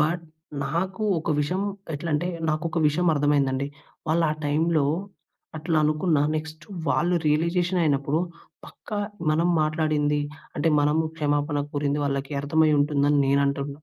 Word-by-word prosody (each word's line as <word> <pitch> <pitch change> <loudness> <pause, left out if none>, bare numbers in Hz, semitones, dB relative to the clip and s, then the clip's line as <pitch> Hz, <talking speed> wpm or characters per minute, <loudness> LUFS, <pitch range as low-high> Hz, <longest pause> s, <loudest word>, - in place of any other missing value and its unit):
But 165 +3 0 0.4
నాకు 185 +8 -2 0.2
ఒక 160 - -3
విషయం 180 +7 -1 0.3
ఎట్లంటే 155 +2 -1 0.2
నాకొక 165 +2 -1
విషయం 175 +4 0
అర్థమైందండి. 140 -2 +1 0.4
వాళ్ళా 165 0 +2 0.2
టైంలో 155 +1 +2 0.7
అట్ల 160 +1 -2
అనుకున్నా 155 0 +2
నెక్స్ట్ 155 +1 -6 0.2
వాళ్ళు 175 +5 +2
రియలైజేషన్ 170 +4 +1
అయినప్పుడు 145 -1 +1 0.5
పక్కా 210 - -7 0.3
మనం 165 +3 +2
మాట్లాడింది, 155 -1 +1 0.4
అంటే 150 +3 +1
మనం 150 +2 +2 0.2
క్షమాపణ 145 -1 0
కోరింది 145 0 0
వాళ్లకి 140 0 -2
అర్థమై 155 +2 +3
ఉంటుందని 145 0 +2
నేను 140 +1 +3
అంటున్నాను. 140 +1 -3
150 Hz, 120 wpm, -25 LUFS, 145-165 Hz, 0.7 s, అర్థమై